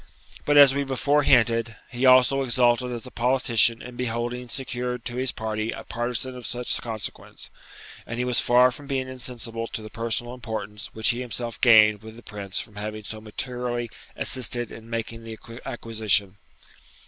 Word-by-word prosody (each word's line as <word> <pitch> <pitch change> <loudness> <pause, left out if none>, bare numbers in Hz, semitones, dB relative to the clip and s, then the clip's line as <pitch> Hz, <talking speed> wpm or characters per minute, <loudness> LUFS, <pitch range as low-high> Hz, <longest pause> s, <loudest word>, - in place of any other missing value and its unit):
But, 145 0 +3
as 140 -2 +9
we 140 +1 0
before 140 +2 +1
hinted, 115 -4 +3 0.2
he 125 +2 +1
also 130 +1 +6
exulted 125 -1 +3
as 120 0 -6
a 125 - -10
politician 120 -2 +2
in 125 0 -9
beholding 120 0 -3
secured 125 -2 -3
to 120 - -4
his 130 0 +1
party 110 0 -3
a - - -7
partizan 120 +2 -2
of 125 -2 -5
such 125 +1 -1
consequence; 110 -3 -6 0.6
and 120 - -5
he 125 - 0
was 125 -2 +2
far 125 +1 +5
from 140 +3 -10
being 135 -2 -1
insensible 120 -3 -4
to 110 - -5
the 110 - -9
personal 115 +1 -3
importance 110 -4 -6
which 110 0 +2
he 120 +2 0
himself 120 -2 -4
gained 110 -3 +6
with 110 0 -11
the 120 - -13
Prince 100 -2 -3
from 105 -2 -8
having 105 +1 -5
so 110 +1 -7
materially 120 +1 -4 0.2
assisted 120 -2 0
in 115 0 -11
making 115 0 -4
the 110 -1 -8 0.3
acquisition. 110 -4 0
120 Hz, 170 wpm, -25 LUFS, 110-125 Hz, 0.6 s, as